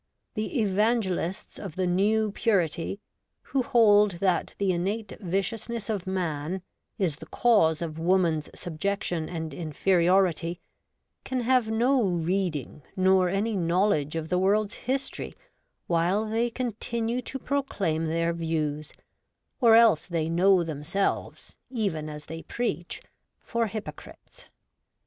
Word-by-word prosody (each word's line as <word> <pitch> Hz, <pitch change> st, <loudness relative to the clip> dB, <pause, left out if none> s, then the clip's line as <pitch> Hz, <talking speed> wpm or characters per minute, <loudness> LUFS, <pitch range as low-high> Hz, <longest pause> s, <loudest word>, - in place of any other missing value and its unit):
The 215 Hz, +5 st, -2 dB
Evangelists 200 Hz, -3 st, 0 dB
of 195 Hz, -7 st, -7 dB
the 185 Hz, -, 0 dB
New 205 Hz, +4 st, +2 dB
Purity, 195 Hz, -3 st, 0 dB, 0.4 s
who 270 Hz, -, 0 dB
hold 210 Hz, -4 st, +5 dB
that 180 Hz, +1 st, 0 dB
the 200 Hz, -2 st, +1 dB
innate 195 Hz, +5 st, -2 dB
viciousness 215 Hz, +4 st, -2 dB
of 195 Hz, -4 st, -3 dB
man 175 Hz, -1 st, -2 dB, 0.3 s
is 175 Hz, -9 st, 0 dB
the -, -, -11 dB
cause 175 Hz, -10 st, +3 dB
of 160 Hz, -1 st, -5 dB
woman's 170 Hz, -3 st, +2 dB
subjection 175 Hz, -1 st, -2 dB
and 160 Hz, -3 st, -5 dB
inferiority, 175 Hz, +2 st, +1 dB, 0.6 s
can 260 Hz, -1 st, -2 dB
have 245 Hz, -2 st, +2 dB
no 245 Hz, +4 st, +3 dB
reading 175 Hz, -, -1 dB
nor 185 Hz, -1 st, +4 dB
any 205 Hz, +4 st, 0 dB
knowledge 170 Hz, -4 st, +1 dB
of 160 Hz, -1 st, -3 dB
the 180 Hz, -, +2 dB
world's 205 Hz, +3 st, +2 dB, 0.2 s
history 270 Hz, +1 st, -2 dB, 0.5 s
while 175 Hz, +5 st, +1 dB
they 230 Hz, +2 st, 0 dB
continue 235 Hz, 0 st, -2 dB
to 270 Hz, -, -5 dB
proclaim 205 Hz, -, -1 dB
their 165 Hz, +1 st, 0 dB
views; 155 Hz, -3 st, -2 dB, 0.7 s
or 230 Hz, -4 st, +6 dB
else 220 Hz, -9 st, +5 dB
they 165 Hz, -2 st, -1 dB
know 180 Hz, +2 st, +4 dB
themselves, 165 Hz, +5 st, -3 dB
even 195 Hz, -11 st, -2 dB
as 150 Hz, 0 st, -8 dB
they 165 Hz, 0 st, -7 dB
preach, 175 Hz, -8 st, -3 dB, 0.4 s
for 235 Hz, -1 st, -1 dB
hypocrites. 215 Hz, -, -9 dB
190 Hz, 120 wpm, -27 LUFS, 165-220 Hz, 0.7 s, or